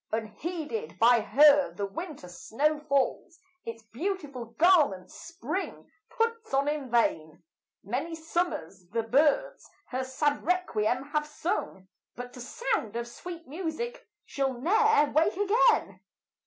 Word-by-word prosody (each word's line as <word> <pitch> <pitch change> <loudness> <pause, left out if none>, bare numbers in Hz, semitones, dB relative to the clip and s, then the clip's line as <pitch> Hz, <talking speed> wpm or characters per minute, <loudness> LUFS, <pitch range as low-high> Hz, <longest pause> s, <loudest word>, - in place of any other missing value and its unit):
Unheeded 320 - -4
by 235 +1 +6
her 285 - +5
the 200 +3 -3
winter 295 - -7
snow 285 +12 -1
falls, 295 +4 -1 0.3
Its 230 0 -7
beautiful 280 - -4
garment 290 - +3
spring 335 +3 -6 0.2
puts 460 - -1
on 275 +1 +2
in 295 -3 -2
vain; 160 -10 0 0.4
Many 265 - -3
summers 320 - -3
the 230 +2 -1
birds 305 - +1 0.2
her 260 +1 -2
sad 285 +3 -1
requiem 275 -7 0
have 300 0 -1
sung, 300 - -3 0.3
But 245 0 -8
to 250 - -9
sound 245 - -2
of 235 0 -3
sweet 335 +7 -9
music 360 - -5 0.2
she'll 270 -1 -1
ne'er 420 - +3
wake 320 +3 +2
again. 410 +3 +3
290 Hz, 125 wpm, -28 LUFS, 235-345 Hz, 0.4 s, by